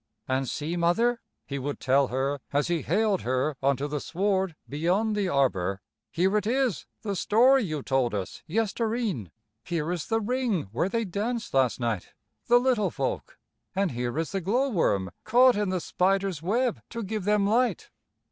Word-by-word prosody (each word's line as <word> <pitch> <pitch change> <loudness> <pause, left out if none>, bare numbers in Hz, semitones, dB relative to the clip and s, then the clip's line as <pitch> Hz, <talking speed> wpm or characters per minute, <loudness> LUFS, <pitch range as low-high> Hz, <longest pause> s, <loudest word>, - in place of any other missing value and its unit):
"An' 130 0 0
see, 155 +7 -3
Mother," 230 +8 +2 0.2
he 140 -1 -4
would 145 +2 -4
tell 135 +1 +3
her, 135 +3 -1
as 145 +3 +1
he 170 -2 +1
haled 210 -3 +1
her 130 +4 0
on 135 0 +2
to 145 - -2
the 150 0 -3
sward 190 +1 0
beyond 180 +9 0
the 200 -3 0
arbor, 100 - +1 0.3
"here 190 +4 +1
it 210 - -1
is, 250 - 0 0.2
the 200 -3 -2
story 250 +8 +4
you 155 -5 -3
told 130 -4 +1
us 95 -2 -5
yester 220 +4 0
e'en. 185 - -2 0.3
Here 165 -1 -2
is 175 -3 -3
the 225 0 +1
ring 230 - 0
where 135 - 0
they 230 +2 -1
danced 220 +5 -3
last 130 -3 +2
night, 115 -6 -2 0.3
the 240 - +6
little 245 -4 +2
folk, - - -4 0.4
an' 195 -1 +1
here 120 0 -3
is 165 0 -1
the 195 - -2
glow 245 +10 +1
worm 100 - +1
caught 250 +3 +5
in 205 -1 0
the 185 -1 0
spider's 190 -1 0
web 230 +7 0
to 230 -1 -5
give 210 -1 -3
them 210 -1 +3
light." 230 -1 +1
185 Hz, 180 wpm, -27 LUFS, 140-220 Hz, 0.4 s, the